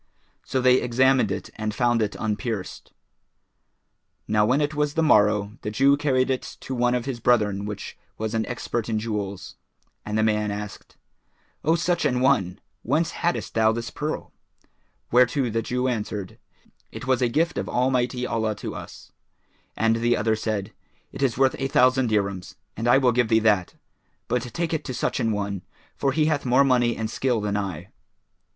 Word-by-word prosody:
So 130 - -1
they 125 0 +5
examined 125 -2 +3
it 95 - -5
and 110 -1 -3
found 120 -2 +2
it 105 -1 -1
unpierced. 110 -3 -4 1.4
Now 105 0 +3
when 130 +4 +3
it 150 0 0
was 150 -1 -1
the 165 - +2
morrow, 105 -5 +3
the - - -3
Jew 135 +6 +4
carried 135 -2 +1
it 130 - 0 0.2
to 130 - -5
one 125 0 +2
of 125 -1 -2
his 130 -3 -4
brethren 105 -4 +2
which 105 -1 -6 0.2
was 110 0 -3
an 110 -1 +1
expert 120 -2 -3
in 110 - 0
jewels, 105 -3 -4 0.5
and 105 0 -3
the 110 - +2
man 105 -1 +1
asked, 105 0 -7 0.7
"O 160 +2 +3
such 175 +1 0
an 125 -4 +1
one! 105 -9 +2 0.2
whence 155 +7 0
haddest 175 +1 -2
thou 110 -1 +4
this 115 0 -4
pearl?"; 150 +1 -4 0.8
whereto 125 +1 +3
the 115 +1 0
Jew 125 +3 -1
answered, 105 -5 -4 0.5
"It - - -8
was 130 -1 +1
a 125 - +3
gift 155 -1 0
of 100 - -4
Almighty 125 0 0
Allah 110 -3 -1
to 100 - -6
us," - - -10 0.7
and 115 0 +2
the 120 +1 +2
other 110 +1 +1
said, 110 -2 -3 0.4
"It - - -8
is 130 -5 +1
worth 135 0 +3
a 135 - 0
thousand 130 -3 +3
dirhams 100 -3 -1 0.2
and 115 +2 -3
I 120 - +6
will 130 -2 +3
give 120 0 +2
thee 110 - +3
that; 105 -5 +2 0.5
but 125 - 0
take 165 +8 -3
it 160 - -1
to 130 - -4
such - - -1
an 115 - +1
one, 100 -2 -3 0.3
for 135 - 0
he 150 +3 +2
hath 150 -2 0
more 130 +2 +4
money 125 -3 +2
and 110 - -2
skill 125 +1 0
than 105 -1 -2
I." 95 -6 -4
120 Hz, 185 wpm, -24 LUFS, 105-130 Hz, 1.4 s, I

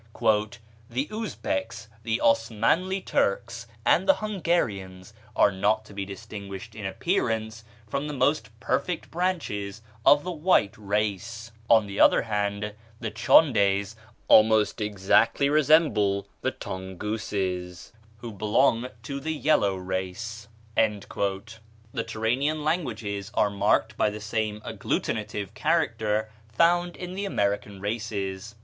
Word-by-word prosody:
"The 130 +5 -2
Uzbecs, 225 - -3
the 115 0 -1
Osmanli 115 - +2
Turks, 115 +3 -1 0.2
and 190 - +3
the 290 - +7
Hungarians 110 - -2 0.2
are 100 - +5
not 100 +3 +1
to 105 - -14
be 100 0 -4
distinguished 100 +2 -8
in 105 -2 -5
appearance 110 - -1 0.2
from 140 +7 -3
the 150 - -4
most 135 -1 +1
perfect 165 +8 -2
branches 115 - -2 0.2
of 145 +3 +6
the 180 - -3
white 160 - +2
race; 105 +2 -2 0.2
on 110 -2 +6
the 100 0 -6
other - - +6
hand, 105 -1 -2 0.3
the 115 -2 -4
Tchondes 105 -4 +4 0.3
almost 110 0 +5
exactly 105 +7 +2
resemble 120 -11 +3
the - - +1
Tongouses, 95 -1 -4 0.3
who 120 - -6
belong 110 +4 +2 0.2
to 140 +4 -4
the 160 +3 -2
yellow 125 -11 +2
race. 95 +4 -5 0.3
The 105 -2 +2 1.0
Turanian 125 +7 -1
languages 110 - -2
are 105 - +3
marked 105 +2 +1
by - - +3
the 105 +1 -7
same 105 0 -2
agglutinative 105 -3 -3
character 110 -4 0 0.2
found 175 +7 +3
in 180 0 -7
the 200 +2 -3
American 100 - -1
races. 105 -1 -4
110 Hz, 115 wpm, -26 LUFS, 100-140 Hz, 1.0 s, the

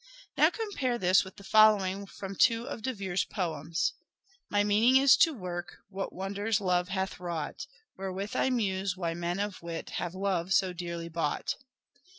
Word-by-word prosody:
Now - - +6
compare 285 - -2
this 185 -2 +4
with 190 -1 -11
the 200 - -13
following 200 -2 +4
from 195 0 -7
two 230 +4 +3
of - - -5
De 260 - -1
Vere's 190 -6 -1
poems: 165 0 -2 0.2
— - - -43
" 390 - -36
My 205 0 +2
meaning 220 +6 +5
is 270 -1 +7
to 325 - +5
work 175 - -6
What 195 0 -4
wonders 200 +3 -1
love 180 -2 +1
hath 190 -1 -2
wrought; 170 -4 -4 0.3
Wherewith 195 +1 -4
I - - +2
muse 195 -6 -1
why 170 -3 -2
men 175 +2 -2
of 205 -2 -3
wit 170 -1 -6
Have 175 +1 -4
love 190 -2 0
so 190 -2 +3
dearly 170 -1 -5
bought." 165 -3 -1
190 Hz, 175 wpm, -29 LUFS, 175-210 Hz, 0.3 s, is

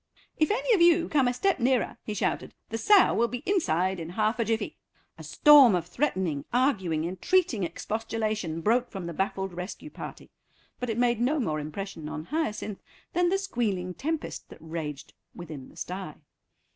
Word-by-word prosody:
"If 310 - +3
any 475 +3 +2
of 385 - +3
you 340 0 +5
come 275 -4 +3
a 245 - +1
step 390 +5 +1
nearer," 250 0 +1
he 215 - -4
shouted, - - -2
"the 225 - -3
sow 405 - +6
will 235 - +2
be 245 +1 -6
inside 190 - +1
in 165 0 -6
half 215 +5 0
a 230 - +2
jiffy." 225 +1 -1 0.4
A - - -8
storm 285 -8 +7
of 175 -2 -1
threatening, 185 - -1
arguing, 190 - +1
entreating 230 - +1
expostulation 215 -1 -3
broke 240 +5 +2
from 190 -3 -6
the 170 - -5
baffled 190 +1 -2
rescue 180 +12 -7
party, - - -9 0.5
but 250 - -3
it 225 - -1
made 240 -1 +2
no 290 +5 +2
more 155 - -1
impression 155 +1 -6
on 155 +1 -6
Hyacinth 215 - -3 0.3
than 350 0 +3
the 385 - +2
squealing 210 - -2
tempest 315 - -4
that - - -12
raged 160 -3 -6 0.2
within 155 -6 -8
the - - -18
stye. 180 -4 -5
215 Hz, 175 wpm, -27 LUFS, 175-280 Hz, 0.5 s, storm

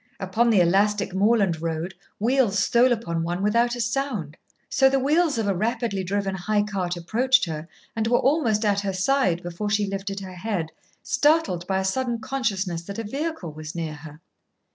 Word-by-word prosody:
Upon 215 +6 +1
the 210 -5 +5
elastic 200 +3 +2
moorland 195 -4 +2
road 165 +2 -3 0.2
wheels 235 -2 +2
stole 235 +5 +4
upon 170 -8 -1
one 175 +3 -2
without 235 +3 +2
sound. 235 - -2 0.3
So 265 0 +4
the 270 - +2
wheels 295 +2 +2
of 225 - 0
a 200 - +2
rapidly 220 -1 -1
driven 195 +1 -1
high 205 +3 0
cart 185 -4 -3
approached 250 +9 +2
her 160 -1 -5 0.3
and 220 0 0
were 240 +1 +4
almost 235 -7 +2
at 200 -1 +2
her 200 -1 -2
side 190 -3 +1
before 175 +4 -4
she 205 0 +1
lifted 195 0 -4
her 190 -1 -8
head, 180 -5 -3 0.3
startled 295 - +2
by 190 - 0
a 190 - -2
sudden 240 +4 -1
consciousness 210 -9 -2
that 200 +1 -7
a 225 - -3
vehicle 275 - -4
was 155 +1 -8
near 165 -2 -3
her. 150 0 -11
205 Hz, 180 wpm, -24 LUFS, 180-240 Hz, 0.3 s, the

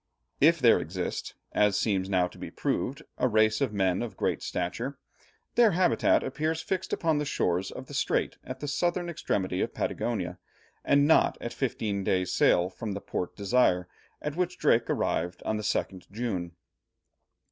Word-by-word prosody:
If 165 +4 +6
there 125 -7 +5
exist, - - -4 0.2
as 105 -1 +3
seems 95 -3 0
now 90 -2 +2
to - - -15
be - - -6
proved, 140 +4 -2 0.2
a - - +3
race 110 -1 +3
of 135 -5 +1
men 95 -2 +1
of 115 -5 -5
great - - 0
stature, 115 +10 -3 0.6
their 230 -5 +5
habitat 180 +1 +3
appears 155 +4 -1
fixed 190 0 -2
upon 160 -3 +1
the - - 0
shores 95 -9 0
of - - -8
the - - -11
Strait - - 0
at 130 0 -7
the 145 - -3
southern 175 +4 0
extremity 95 - -1
of - - -2
Patagonia, - - -2 0.4
and 140 0 +4
not 160 - +4
at 120 - -5
fifteen 110 -6 -2
days' 90 -1 0
sail 90 0 +4
from 100 +2 -5
Port 95 -2 -4
Desire, 100 -4 +2 0.4
at 150 0 -3
which 180 0 -1
Drake 120 -6 +3
arrived 90 +2 -1
on 110 - 0
the - - -3
2nd 95 -2 -2
June. 100 -6 -3
115 Hz, 170 wpm, -28 LUFS, 95-145 Hz, 0.6 s, If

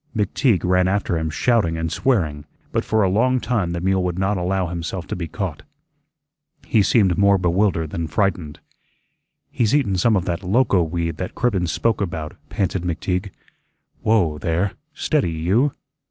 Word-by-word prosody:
McTeague 105 - +1
ran 90 0 +3
after 95 -2 0
him 80 -1 -1
shouting 85 -1 +1
and 80 0 -2
swearing, 80 - 0 0.3
but - - 0
for 110 -1 +1
a - - +3
long 125 +7 +2
time 115 -8 -1
the 85 0 -3
mule 95 +1 +1
would 90 -1 -2
not 95 +2 +1
allow 95 +1 0
himself 85 +1 -4
to - - -4
be 85 -2 -4
caught. 85 -1 -4 1.0
He 110 - +3
seemed 95 -4 +3
more 100 0 +5
bewildered 90 -3 +1
than 85 -1 -3
frightened. 85 -5 -1 0.9
"He's 115 0 +1
eatun 105 -11 +2
some 110 +4 +3
of 90 -3 0
that 85 -1 -2
loco 100 0 +2
weed 85 0 -2
that 90 - -5
Cribbens 100 -9 0
spoke 115 +3 0
about," 80 -5 -4
panted 95 -2 -1
McTeague. 90 +3 -2 0.7
"Whoa, 90 -9 +2
there; 85 +4 0 0.2
steady, 150 - 0
you." 100 - +1
95 Hz, 165 wpm, -21 LUFS, 85-105 Hz, 1.0 s, more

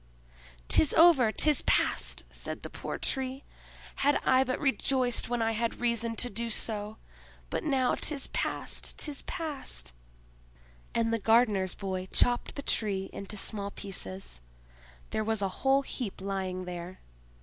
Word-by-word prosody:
"'Tis 300 - +4
over—'tis 300 -3 +6
past!" - - +1
said - - -5
the - - -7
poor - - -5
Tree. 265 0 -2 0.5
"Had 285 +1 +3
I 260 0 +5
but 255 -1 -2
rejoiced 265 -4 +1
when 240 -1 0
I 225 - +2
had 230 +1 -2
reason 235 -1 +1
to 245 - 0
do 230 +3 -2
so! 215 -1 -1 0.5
But - - -1
now 270 -5 +2
'tis 285 -3 +1
past, - - -3
'tis 295 -2 -2
past!" 270 - -5 1.0
And 230 0 +2
the 230 - +1
gardener's 210 -4 +3
boy 190 -2 -4
chopped 245 +5 +1
the 280 - -5
Tree 195 -6 0
into 200 +2 -7
small 200 0 -1
pieces; 95 - -5 0.7
there 220 - 0
was 220 0 0
a 195 - +1
whole 270 +1 +4
heap 240 -7 -4
lying 190 -1 -3
there. 180 +1 -7
225 Hz, 140 wpm, -30 LUFS, 195-260 Hz, 1.0 s, over—'tis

